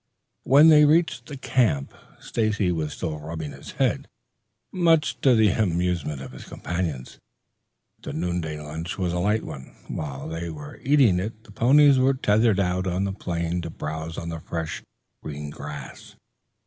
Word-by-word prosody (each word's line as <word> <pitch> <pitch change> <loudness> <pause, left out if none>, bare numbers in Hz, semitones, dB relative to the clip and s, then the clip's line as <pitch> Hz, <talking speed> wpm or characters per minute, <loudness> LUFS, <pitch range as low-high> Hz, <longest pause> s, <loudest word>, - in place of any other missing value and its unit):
When 145 +5 +7
they 150 -1 +8
reached 160 +3 +2
the 145 - -7
camp, 110 - +1 0.3
Stacy 105 -4 0
was 80 -3 -2
still 75 -2 -4
rubbing 80 -1 -6
his - - -10
head, - - 0 0.6
much 165 -4 +2
to 130 -3 +5
the 110 -2 +5
amusement 90 -7 -1
of 65 - -9
his 65 - -11
companions. 80 -7 -4 0.8
The - - -6
noonday 85 -2 -3
lunch 80 +3 -6
was 90 -3 -1
a 90 - -1
light 105 +4 +1
one; 65 -1 -9
while 70 -3 -5
they 80 +1 -4
were 75 -2 -9
eating 130 -9 +4
it 110 +3 -5
the 115 - -16
ponies 135 +5 +5
were 130 +1 +3
tethered 110 -3 +3
out 90 0 0
on 90 +1 0
the 100 -1 -2
plain 85 -2 -2
to 85 - -5
browse 80 +1 -5
on 85 - -4
the 80 -1 -5
fresh, 80 -1 -4 0.4
green 75 -1 -6
grass. 75 0 -9
90 Hz, 160 wpm, -25 LUFS, 80-110 Hz, 0.8 s, they